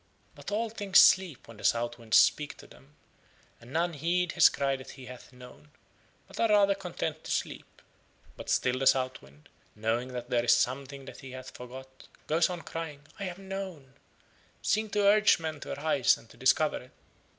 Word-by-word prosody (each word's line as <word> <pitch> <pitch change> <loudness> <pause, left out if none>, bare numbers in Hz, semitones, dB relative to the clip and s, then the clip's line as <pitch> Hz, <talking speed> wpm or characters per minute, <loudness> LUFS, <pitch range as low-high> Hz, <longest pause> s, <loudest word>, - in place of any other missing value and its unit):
But - - -9
all 220 +2 -1
things 205 -3 +4
sleep 185 -7 +4
when 115 - -13
the - - -13
South 120 0 0
Wind 115 -1 -1
speaks 150 -1 +4
to - - -14
them 145 +2 -19 0.6
and 120 +2 -15
none 170 +3 0
heed 170 +4 0
his - - +6
cry 135 -1 -1
that 130 -1 -10
he 130 - -10
hath 125 +1 -12
known, 125 +3 -15 0.6
but - - -12
are 230 - +3
rather 200 -1 +5
content 175 -5 -5
to - - -9
sleep. - - -4 0.5
But - - -9
still 130 0 +1
the 135 - +1
South 130 -1 +2
Wind, 70 +2 -19 0.3
knowing 115 +3 -1
that 125 0 -6
there 120 -1 +2
is 120 0 +5
something 135 +3 -2
that - - -11
he 130 -1 -10
hath 130 0 -9
forgot, 130 +1 -11 0.2
goes 160 +3 +2
on 175 -2 -6
crying, 160 -3 -6 0.2
"I 200 - -3
have 180 -1 -5
known," 190 -8 -7 0.7
seeking 215 +1 +1
to 205 0 +1
urge 210 +1 +5
men 160 -2 -5
to - - -6
arise 145 -4 +2
and 115 - -18
to - - -16
discover 150 +4 +2
it. 125 - -17
140 Hz, 195 wpm, -29 LUFS, 125-180 Hz, 0.7 s, his